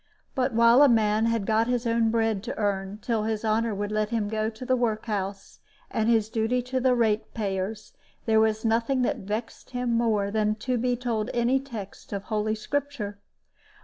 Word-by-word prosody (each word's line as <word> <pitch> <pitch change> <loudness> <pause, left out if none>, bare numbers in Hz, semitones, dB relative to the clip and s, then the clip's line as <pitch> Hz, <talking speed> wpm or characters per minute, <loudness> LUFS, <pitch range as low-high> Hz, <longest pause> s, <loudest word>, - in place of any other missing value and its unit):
But 260 -1 0
while 235 +3 +6
a 290 - +7
man 220 -1 +3
had 230 -3 0
got 220 +2 +2
his 245 -1 0
own 230 -1 +2
bread 225 -3 +1
to 250 - -5
earn, 200 -1 -1
till 230 -3 0
his 220 0 -2
honor 220 0 +1
would 205 +1 -3
let 215 0 0
him 220 -3 -1
go 220 0 -1
to 225 +3 -9
the 255 0 +2
work 225 -3 -1
house, 195 -2 -4 0.3
and 220 +1 +1
his 225 -3 +3
duty 225 +3 0
to 255 +1 -2
the 255 0 +3
rate 220 -3 +1
payers, 205 0 -3 0.3
there 220 -1 +4
was 220 0 +1
nothing 235 +3 +2
that - - 0
vexed 210 +4 -5
him 245 -1 -2
more 215 -4 +1
than 215 0 +1
to 245 +3 -2
be 245 +1 +1
told 235 -2 -2
any 240 +3 +2
texts 230 -8 -9
of 200 -1 -3
Holy 215 0 -1
Scripture. 230 -4 -3
225 Hz, 195 wpm, -26 LUFS, 215-240 Hz, 0.3 s, a